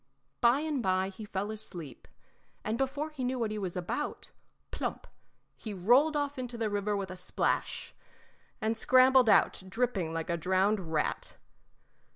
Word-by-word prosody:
By 240 +4 +5
and 305 -4 -1
by 190 -1 +1
he 195 +3 -9
fell 205 +1 -3
asleep, 175 - -8 0.6
and 215 - -1
before 280 +5 -2
he 280 -4 -5
knew 255 +1 -1
what 225 -3 -1
he 215 - -3
was 185 -3 -4
about 180 +11 -4 0.4
plump - - -4 0.5
he 215 -3 -7
rolled 250 - +4
off 285 -2 -2
into 245 -2 -5
the 220 -2 -1
river 205 0 0
with 195 -2 -4
a - - -6
splash, 180 0 -1 0.7
and 220 -1 0
scrambled 255 +1 +5
out, 200 - +4
dripping 200 -6 -1
like 165 +1 -3
a 170 - 0
drowned 185 +1 +1
rat. 155 -2 -1
215 Hz, 160 wpm, -30 LUFS, 185-255 Hz, 0.7 s, By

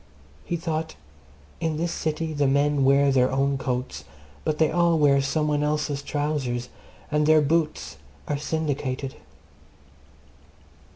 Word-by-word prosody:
He 175 - -2
thought 160 - -3 0.6
In 160 -2 -1
this 170 +1 -1
city 160 0 -2
the 145 -2 +1
men 140 +1 +2
wear 140 +1 +4
their 130 -1 +3
own 135 +1 +1
coats, 125 - -3 0.4
but 155 -1 -1
they 160 -1 +3
all 170 0 +3
wear 140 -2 +4
some 150 +3 0
one 145 -1 +1
else's 150 -1 -1
trousers, 140 -5 -2 0.4
and 150 0 +2
their 155 0 +6
boots 155 +1 0 0.3
are 145 -1 -1
syndicated. 145 -4 -2
145 Hz, 130 wpm, -25 LUFS, 140-155 Hz, 0.6 s, their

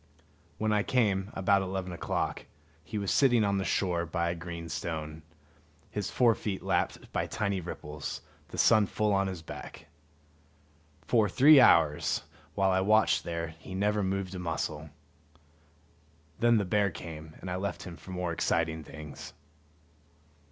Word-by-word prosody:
When 110 0 0
I 105 - +3
came, 100 -5 +1
about 100 +1 +3
eleven 95 -1 -3
o'clock, 85 - -3 0.4
he 110 - -5
was 100 -2 -1
sitting 120 -5 +4
on 100 -1 +1
the - - -1
shore 90 -1 0
by 85 0 -1
a - - -4
green 85 -1 -7
stone, 80 -1 -4 0.7
his 105 -2 -3
fore 120 -3 +4
feet 100 -3 -4
lapped - - -1
by - - -1
tiny 100 -3 -1
ripples, 75 -3 -6 0.3
the - - -9
sun 110 -3 +5
full 105 +1 0
on 100 0 +2
his 90 -4 -6
back. - - -9 1.2
For 110 +1 +3
three 140 - +7
hours, 75 - +4 0.3
while 95 -1 +3
I 95 0 +2
watched 110 +3 +3
there, 85 -1 -3
he 95 +3 -8
never 105 +2 +1
moved 95 -1 -2
a 95 - -5
muscle. 80 -2 -3 1.5
Then 120 0 +4
the 100 - +1
bear 100 +2 +2
came, 80 -2 -9
and 90 - -6
I 90 - -1
left 100 +2 -3
him 90 -2 -8
for 95 - -15
more 90 -2 -2
exciting 80 -1 0
things. 75 -1 -10
95 Hz, 155 wpm, -30 LUFS, 85-105 Hz, 1.5 s, three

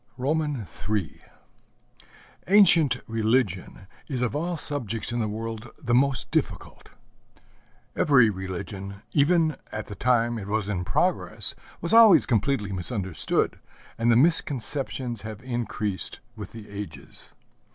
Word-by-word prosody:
III 125 - -2 1.3
Ancient 170 - +5
religion 110 -5 -1 0.2
is 130 -4 -2
of 125 - -1
all 170 +3 -2
subjects 120 -9 0
in 120 - -2
the 110 - 0
world 115 +2 -6
the 120 -6 -2
most 135 +1 +2
difficult. - - -3 1.1
Every 125 -7 +4
religion, 95 +1 -7
even 155 0 +2
at 105 - -5
the - - -9
time 120 +2 +1
it 100 - -8
was 105 -1 -1
in 95 -4 -2
progress, - - +2 0.3
was 170 +6 -1
always 225 -4 +8
completely 110 -2 0
misunderstood, 95 - -1 0.4
and 115 +1 +2
the - - +4
misconceptions 135 -4 0
have 110 +2 -8
increased 115 -5 -3 0.2
with 105 -2 -8
the 110 -2 -11
ages. 100 0 -9
115 Hz, 120 wpm, -25 LUFS, 105-140 Hz, 1.3 s, always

